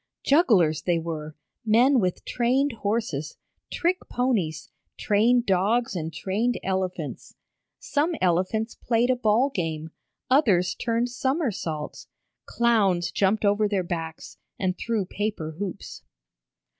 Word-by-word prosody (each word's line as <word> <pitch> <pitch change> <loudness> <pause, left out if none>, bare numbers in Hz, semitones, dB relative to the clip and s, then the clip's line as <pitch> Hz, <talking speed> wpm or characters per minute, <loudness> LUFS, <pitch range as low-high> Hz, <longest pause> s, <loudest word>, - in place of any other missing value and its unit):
Jugglers 210 - +4
they 175 -2 +1
were, 155 -2 -5 0.3
men 245 +5 +4
with 180 -4 -1
trained 260 +4 +1
horses, 205 - -3 0.3
trick 360 +2 0
ponies, 190 - -1 0.3
trained 235 +4 +3
dogs 200 +4 +1
and 160 -2 -3
trained 220 +8 -1
elephants. 185 -5 -3 0.4
Some 310 +4 -1
elephants 185 +6 0
played 235 +1 +1
a - - +2
ball 245 +3 +2
game, 160 -2 -3 0.4
others 205 - +3
turned 235 +1 -1
somersaults. 240 - -3 0.4
Clowns 205 -7 +2
jumped 205 +2 +1
over 205 +1 +3
their 200 -3 0
backs, 165 -2 -6 0.2
and 185 -1 -1
through 225 -3 -2
paper 200 -5 -3
hoops. 200 -1 -6
205 Hz, 115 wpm, -25 LUFS, 175-240 Hz, 0.4 s, Jugglers